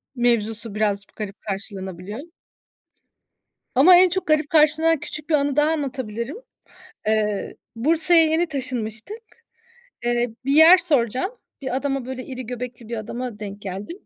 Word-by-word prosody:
mevzusu 230 -3 0
biraz 205 -2 0
p - - -29
garip 205 -1 -6
karşılanabiliyor. 195 0 -6 1.6
Ama 360 0 +8
en 365 +1 +7
çok 375 +2 -2
garip 305 -1 +2
karşılanan 315 +1 +4
küçük 300 +1 -7
bir - - +3
anı 285 -1 +1
daha 300 +1 +3
anlatabilirim. 260 - -3 0.7
Eee, 215 -2 0 0.2
Bursa'ya 325 +6 +4
yeni 320 +2 +1
taşınmıştık. 255 - -5 0.8
Eee, 240 0 +1 0.2
bir 275 - 0
yer 320 +5 +8
soracağım. 265 - +1 0.3
Bir 260 -1 -2
adama, 270 -2 -2
böyle, 255 -1 -6
iri 255 -2 -7
göbekli 245 -1 -7
bir 235 - -4
adama 235 +1 -5
denk 205 -1 -8
geldim. 200 - -6
250 Hz, 135 wpm, -22 LUFS, 215-305 Hz, 1.6 s, Ama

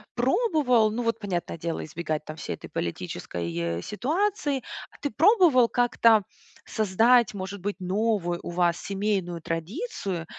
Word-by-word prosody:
пробовал, 250 - +3
ну 240 +3 -2
вот 230 0 0
понятное 185 -5 -3
дело, 165 +1 -3
избегать 155 -1 -4
там 155 - -7
всей - - -4
этой - - -11
политической 85 -1 -3
ситуации. 295 - -1 0.3
А - - -18
ты 285 - -2
пробовал 320 - +5
как-то 230 -3 +4 0.4
создать, 225 +3 +3
может 190 0 -6
быть, 205 +1 -2
новую 185 -2 0
у - - -5
вас 175 -1 +2
семейную 195 -4 -2
традицию? 185 - -4
205 Hz, 135 wpm, -26 LUFS, 170-245 Hz, 0.4 s, пробовал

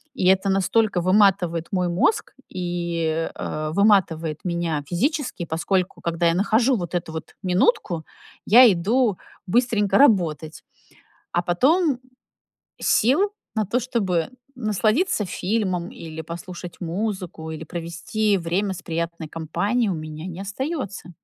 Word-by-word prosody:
И 185 - -1
это 190 +1 +4
настолько 195 +1 +2
выматывает 185 -3 +3
мой 180 -2 +1
мозг 180 - +1 0.2
и, 170 -3 -2
э, 155 0 -4
выматывает 170 -7 +2
меня 170 -4 -1
физически. 255 - -1
Поскольку, 180 +3 -1
когда 170 0 -1
я 165 - +3
нахожу 225 +6 +3
вот 175 -1 -4
эту 165 -2 -3
вот 160 - -7
минутку, 180 - +1 0.4
я 240 +3 +8
иду 210 +4 +1 0.3
быстренько 215 -1 +2
работать. 165 - +2 0.7
А 175 - 0
потом 275 - +2 0.8
сил 325 - +3 0.2
на 215 -1 +1
то, 235 +6 0
чтобы 195 -9 -1 0.3
насладиться 215 - +1
фильмом 185 -4 -1
или 160 -1 -8
послушать 170 +2 -8
музыку, 180 -3 -4
или 160 0 -6
провести 175 +6 -1
время 185 +4 -1
с 180 - -10
приятной 170 -1 -3
компанией, 200 +9 -1
у 180 - -1
меня 155 +2 -7
не 180 +1 -7
остаётся. 205 - -4
180 Hz, 125 wpm, -23 LUFS, 170-215 Hz, 0.8 s, я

